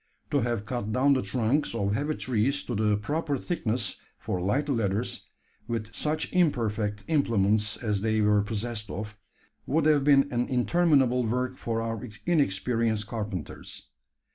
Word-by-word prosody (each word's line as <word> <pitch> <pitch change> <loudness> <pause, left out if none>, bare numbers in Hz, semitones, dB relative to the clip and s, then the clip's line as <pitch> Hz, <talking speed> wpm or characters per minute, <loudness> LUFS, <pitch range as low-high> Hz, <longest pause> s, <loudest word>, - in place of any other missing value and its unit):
To 145 - +3
have 120 -4 -1
cut 120 -4 -3
down 135 +5 +4
the 130 - +2
trunks 115 +6 0
of 100 -2 0
heavy 145 +7 -1
trees 130 +3 0
to 125 - -4
the 105 -1 +2
proper 145 +5 -1
thickness 125 -7 -2 0.2
for 90 - -3
light 115 +12 0
ladders 115 -4 -1 0.4
with 115 -1 -3
such 155 +1 -2
imperfect 110 - +1
implements 110 -7 +2
as 105 -4 -1
they 110 0 +1
were 105 0 +4
possessed 110 0 -3
of 105 +3 -5 0.5
would 155 +2 +2
have 150 -3 +4
been 140 -1 +5
an 120 0 +1
interminable 130 -2 +3
work 125 +3 -1
for 115 -1 -2
our 115 0 -3 0.2
inexperienced 115 - +1
carpenters. 105 -6 -6
115 Hz, 145 wpm, -27 LUFS, 105-140 Hz, 0.5 s, been